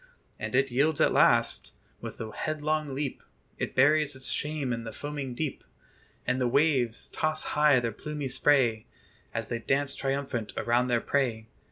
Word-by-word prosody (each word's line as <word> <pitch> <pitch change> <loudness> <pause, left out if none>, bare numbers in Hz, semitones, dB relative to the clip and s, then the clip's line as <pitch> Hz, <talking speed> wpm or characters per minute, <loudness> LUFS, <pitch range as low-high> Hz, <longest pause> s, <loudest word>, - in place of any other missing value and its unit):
And - - -3
it 135 0 +3
yields 145 +5 +2
at - - +4
last: - - +3 0.2
with - - -8
a 110 -1 -5
headlong 155 +1 -2
leap 140 -1 -3 0.4
It - - -3
buries 145 +1 +4
its 130 0 -4
shame 150 -4 -2
in 115 0 -4
the 115 - -6
foaming 140 0 -5
deep, 150 +1 -3 0.6
And 130 0 0
the 125 - +2
waves 130 -3 +2
toss 155 0 -1
high 150 -3 +5
their 120 -1 -2
plumy 150 +4 -5
spray, 125 -4 +2 0.4
As 115 -1 -4
they 120 - -2
dance 135 +3 0
triumphant 135 -5 -2
around 120 +2 +2
their 120 -2 +1
prey. 115 -6 -1
135 Hz, 165 wpm, -28 LUFS, 120-150 Hz, 0.6 s, high